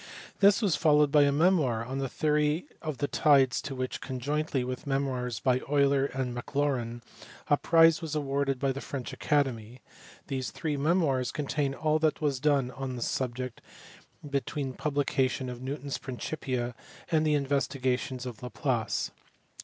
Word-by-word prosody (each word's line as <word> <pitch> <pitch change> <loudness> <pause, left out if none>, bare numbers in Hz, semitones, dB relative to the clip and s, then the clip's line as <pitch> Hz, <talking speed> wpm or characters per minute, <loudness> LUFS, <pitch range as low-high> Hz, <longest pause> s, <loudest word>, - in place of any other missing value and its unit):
This 200 +3 +5
was 195 -6 +3
followed 150 -3 +4
by 145 -1 +6
a 140 - +3
memoir 145 -8 +2
on 130 +3 -4
the 135 -1 -2
theory 150 +3 +1 0.2
of 155 -4 -4
the 145 - -1
tides 135 -5 +4
to 140 -1 -6
which, 130 0 -3
conjointly 140 +1 -2
with 130 +3 -5
memoirs 130 -4 -1
by 130 -1 +2
Euler 140 -1 +3
and 130 -3 -3
Maclaurin, 120 -2 -2 0.5
a 145 - +6
prize 165 +1 +5
was 160 -2 -4
awarded 140 -2 0
by 135 +1 0
the 135 +1 -5
French 135 -3 -5
Academy: 125 -5 -1 0.5
these 130 -2 -3
three 155 -3 -3
memoirs 140 -4 +1
contain 140 -1 -1
all 155 +1 +1
that 155 -1 +1
was 145 -4 0
done 140 -3 +2
on 135 0 -5
this 120 - -2
subject 125 -1 -3 0.7
between 140 0 -2
the - - -14
publication 135 -3 0
of 125 0 -7
Newton 140 +2 -5
s - - -2
Principia 125 -2 -3 0.4
and 155 -1 +3
the 155 -1 +3
investigations 130 -2 -1
of 120 -4 -7
Laplace. 125 -3 -1
140 Hz, 160 wpm, -29 LUFS, 130-150 Hz, 0.7 s, by